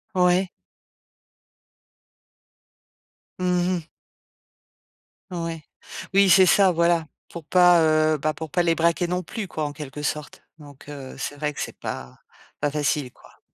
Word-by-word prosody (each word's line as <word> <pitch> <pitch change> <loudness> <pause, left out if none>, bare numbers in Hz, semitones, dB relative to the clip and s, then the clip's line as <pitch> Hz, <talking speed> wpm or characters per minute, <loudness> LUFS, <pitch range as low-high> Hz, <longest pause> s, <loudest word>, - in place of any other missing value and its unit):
Ouais. 180 0 +3 2.9
Mmh 180 0 +1
mh. 165 0 -16 1.4
Ouais. 165 -2 -4 0.5
Oui, 195 0 +5
c'est 190 +1 +7
ça, 195 +1 +5
voilà. 170 -1 +2 0.2
Pour 170 -3 -9
pas, 175 0 +5
heu, 155 0 +3
bah, 155 +2 -1
pour 160 -1 -7
pas 175 +4 +1
les 165 -1 +3
braquer 170 +2 +1
non 180 +1 -1
plus 210 +3 -6
quoi 155 -3 -3
en 145 - -5
quelque 150 -1 -8
sorte? 150 0 -4 0.2
Donc 145 -2 -14
heu, 140 -3 -8
c'est 145 - -4
vrai 150 0 -2
que - - -6
c'est - - -6
pas 65 0 -7 0.4
pas 145 -1 0
facile 145 -3 -1
quoi. - - -21
165 Hz, 140 wpm, -24 LUFS, 150-180 Hz, 2.9 s, c'est